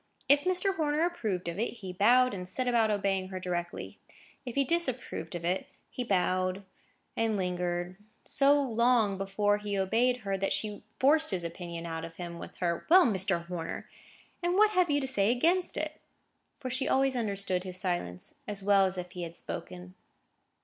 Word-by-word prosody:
If 285 +1 +5
Mr. 370 +1 +2
Horner 305 +1 +1
approved 215 - -2
of 170 +3 -4
it, 230 - -1
he 190 -6 -8
bowed, 245 +6 +4
and 180 -2 -5
set 255 +7 0
about 230 -3 +3
obeying 195 -2 0
her 185 -1 -5
directly; 175 -1 -4 0.5
if 245 - -5
he 275 - +3
disapproved 260 - -2
of 170 -1 -5
it, 180 +2 -1 0.2
he 250 - -3
bowed, 185 -2 0 0.5
and 225 -2 +1
lingered 180 -1 -2 0.3
so 285 +1 +4
long 235 -5 +2
before 205 +1 +1
he 205 -1 -3
obeyed 240 +6 +2
her, 195 -2 -2
that 195 - 0
she 210 -1 -3 0.2
forced 310 +4 +4
his 185 -4 -2
opinion 170 0 -6
out 165 -1 -4
of 165 0 -8
him 170 -1 -7
with - - -9
her 170 -2 -1
"Well, 365 +2 +8
Mr. 190 -6 +1
Horner! 170 -2 -5 0.5
and 350 +1 +1
what 425 +2 +5
have 365 -4 +3
you 290 0 +3
to 265 - -2
say 205 -6 +2
against 335 +10 +2
it?" - - -4 0.6
For 255 -3 -4
she 260 +1 0
always 270 0 +2
understood 200 -5 -1
his 185 -1 -3
silence 175 - -2
as 205 -2 -3
well 195 -1 +5
as 185 0 -3
if 180 -1 -5
he 180 -1 -7
had 170 -1 -6
spoken. 180 0 -6
200 Hz, 185 wpm, -30 LUFS, 180-255 Hz, 0.6 s, Well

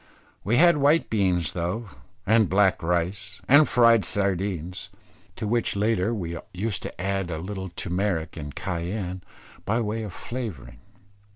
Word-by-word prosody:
We 110 +5 +2
had 170 0 +6
white 145 +3 +3
beans 90 -6 +1
though, 90 +6 -3 0.4
and 110 -1 +4
black 95 0 +3
rice 90 +5 -1
and 145 +3 +6
fried 115 -3 +5
sardines, 95 -3 -2 0.5
to - - -4
which 120 0 +1
latter 105 0 +1
we 85 -7 -4 0.2
used 100 +2 -1
to - - -8
add 95 0 -1
a 80 - -3
little 95 +3 -5
turmeric 90 -1 -2
and 75 -3 -7
cayenne 90 +1 -3 0.4
by 115 +3 0
way 110 0 -2
of 105 -3 -5
flavouring. 110 - -6
100 Hz, 145 wpm, -25 LUFS, 90-110 Hz, 0.5 s, had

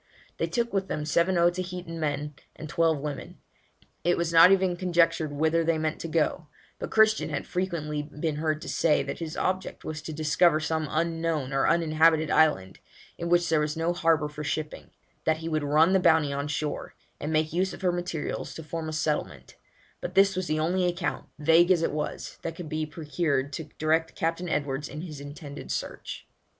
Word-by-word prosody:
They - - 0
took 235 -3 -1
with 195 -1 0
them 150 - -3
seven 170 +4 +2
Otaheitan 175 0 0
men 150 -1 -2 0.2
and 155 - -8
twelve 165 0 +2
women. 145 0 -6 0.7
It 175 - +2
was 170 -1 -1
not 165 +3 +9
even 190 -2 +3
conjectured 170 -3 +2
whither 160 +3 +1
they 165 0 +1
meant 155 0 -2
to - - -4
go; 165 0 0 0.3
but - - -4
Christian 220 0 +4
had - - -3
frequently 170 -5 -2
been 150 +1 -4
heard 155 0 -1
to - - -8
say, 160 -2 +2
that - - -5
his 160 -2 -5
object 185 0 -2
was 155 -1 -4
to 160 - -6
discover 155 +1 +3
some 160 0 -1
unknown 165 -3 -1
or 135 - +2
uninhabited 160 -1 +3
island, 95 -13 +2 0.4
in 170 - -3
which 175 0 +3
there 160 -1 +3
was 150 +1 -1
no 165 +2 +1
harbour 165 -3 +2
for 150 0 -7
shipping; 150 +1 -4 0.4
that 160 0 +2
he 160 +1 -6
would 155 -1 0
run 155 +5 +4
the 190 - +5
Bounty 160 -5 +3
on 140 +1 -2
shore, 150 0 -3 0.2
and 150 - -3
make 155 0 +1
use 185 +2 +1
of - - -10
her 180 - +3
materials 175 -3 -4
to 160 - -7
form 160 +1 -4
a - - -5
settlement; 155 -1 -2 0.5
but 180 - -5
this 195 0 +5
was 185 -1 -2
the 155 0 0
only 180 +3 +1
account, 175 0 -2
vague 165 +3 +5
as 175 -3 +4
it - - +1
was, 150 0 -4
that 165 - -4
could 165 -3 -7
be 155 0 -2
procured 150 -3 -1
to 160 - -4
direct 160 +1 +1
Captain 165 +2 -1
Edwards 145 -1 -2
in 150 +2 -6
his 155 -5 -8
intended 145 0 -8
search. - - -5
160 Hz, 195 wpm, -27 LUFS, 150-175 Hz, 0.7 s, not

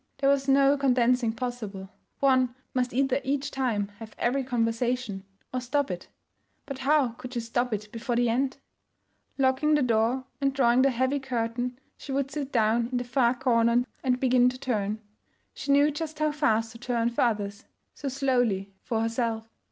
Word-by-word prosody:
There 275 0 +3
was 275 -1 +1
no 275 +1 +5
condensing 250 -3 +2
possible; 220 -5 -5 0.3
one 255 -2 +3 0.2
must 250 -1 0
either 270 +1 +1
each 280 +1 -1
time 230 -7 -1
have 220 -1 -10
every 265 +3 +1
conversation 235 -4 -1 0.3
or 255 - -1
stop 270 -1 0
it. 175 0 -6 0.6
But 275 -2 -6
how 280 -1 +3
could 250 +2 -9
she - - 0
stop 240 +2 -1
it 210 0 -3
before 235 +1 -3
the 240 0 +2
end? 260 +3 0 0.8
Locking 270 +3 +3
the 295 - +2
door 235 +2 +1 0.2
and 275 -1 +1
drawing 245 -1 +4
the 275 - +5
heavy 260 +3 0
curtain, 245 -1 -2 0.2
she 275 - -8
would 275 0 -1
sit 280 -2 -4
down 230 0 +2
in 250 - 0
the 245 - -1
far 245 0 +2
corner 240 -1 +2 0.2
and 255 -1 +1
begin 250 -1 +4
to 255 - -6
turn. 215 -5 -2 0.5
She 280 - -3
knew 285 +2 +5
just 310 +1 -5
how 305 0 +1
fast 225 -6 +1
to 230 - -12
turn 240 -2 0
for 235 - -1
others; 205 -3 -1 0.3
so 285 - -6
slowly 245 -8 0
for 225 -2 -1
herself. 225 -1 -1
250 Hz, 175 wpm, -27 LUFS, 230-270 Hz, 0.8 s, no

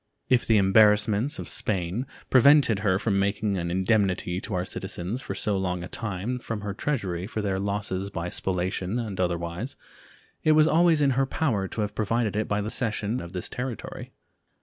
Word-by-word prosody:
If 125 -2 +3
the 110 - +5
embarrassments 105 +5 +4
of - - -6
Spain 95 +5 -1 0.2
prevented 135 -4 +6
her 95 -2 +2
from 100 -1 0
making 100 +1 0
an 85 -1 -2
indemnity 95 -1 +1
to 105 - -4
our 90 0 -1
citizens 95 +5 -3
for - - -5
so 105 -2 0
long 90 -2 -2
a - - -5
time 110 +5 -3
from 115 -3 -5
her 100 -1 -4
treasury 95 -8 -2
for 110 -1 -4
their 95 -2 -1
losses 100 -1 -2
by 85 -3 -4
spoliation 95 +3 -2
and 110 -6 -4
otherwise, 85 +7 -2 0.7
it 155 - +5
was 155 0 +5
always 165 -1 +4
in 140 -1 +4
her 135 +1 +1
power 115 -10 0
to 110 - -4
have 105 0 -2
provided 110 -1 0
it 110 - 0
by 105 0 0
the 105 +2 -3
cession 115 -1 -1
of 85 +1 -9
this 90 - -3
territory. 125 -2 -6
105 Hz, 185 wpm, -26 LUFS, 95-115 Hz, 0.7 s, prevented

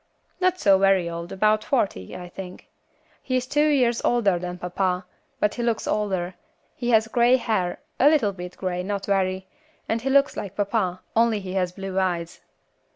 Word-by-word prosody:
"Not 370 0 +2
so 195 -1 +5
very 195 -3 +3
old, 170 0 -6
about 215 +2 +2
forty, 200 - -1
I 180 - -8
think; 180 +1 -9 0.5
he 255 - -2
is 250 - -2
two 295 +3 +2
years 250 -5 +2
older 205 -7 +2
than 180 0 -5
papa, 180 +1 -1 0.3
but 210 - +1
he 240 - -4
looks 235 -2 0
older; 190 -4 -1 0.4
he 245 -1 -3
has 220 -2 +4
grey 240 +2 +4
hair, 215 -8 -1 0.2
a 280 - +7
little 270 -10 +2
bit 180 -1 -8
grey, 180 -1 -2
not 200 +1 -3
very, 190 -1 0 0.4
and 225 0 -1
he 270 - -2
looks 275 +1 +3
like 200 -1 -6
papa, 200 -3 -1
only 230 -1 +3
he 190 -2 -6
has 180 -2 0
blue 190 0 -3
eyes. 175 -3 -2
195 Hz, 180 wpm, -24 LUFS, 180-235 Hz, 0.5 s, a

